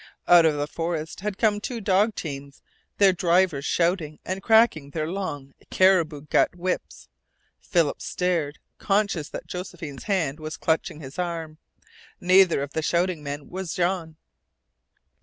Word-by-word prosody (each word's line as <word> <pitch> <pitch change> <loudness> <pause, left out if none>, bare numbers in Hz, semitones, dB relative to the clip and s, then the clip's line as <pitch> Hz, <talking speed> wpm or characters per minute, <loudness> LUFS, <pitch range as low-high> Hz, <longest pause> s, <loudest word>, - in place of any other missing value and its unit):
Out 170 -2 +7
of 155 - +1
the 145 0 -1
forest 160 0 -4
had 200 0 -4
come 210 -2 +2
two 245 0 -4
dog 205 +1 +2
teams, 140 -3 -7 0.3
their 195 -2 +5
drivers 175 -4 +2
shouting 170 -3 0
and 190 +1 -3
cracking 220 -10 +4
their 155 +1 -3
long 145 -7 -5 0.2
caribou 170 -6 +3
gut 150 +4 +1
whips. 180 +1 -4 0.5
Philip 165 -5 0
stared, 170 -5 -1 0.2
conscious 200 -6 0
that - - -7
Josephine's 175 -6 -7
hand 165 -8 0
was 155 0 -6
clutching 160 -1 -1
his 135 +4 -9
arm. 165 -3 -4 0.6
Neither 185 -5 +4
of 140 - -7
the 160 - -1
shouting 175 +1 0
men 145 -1 -6
was 185 -4 -5
Jean. 175 -3 -1
170 Hz, 140 wpm, -25 LUFS, 150-190 Hz, 0.6 s, Out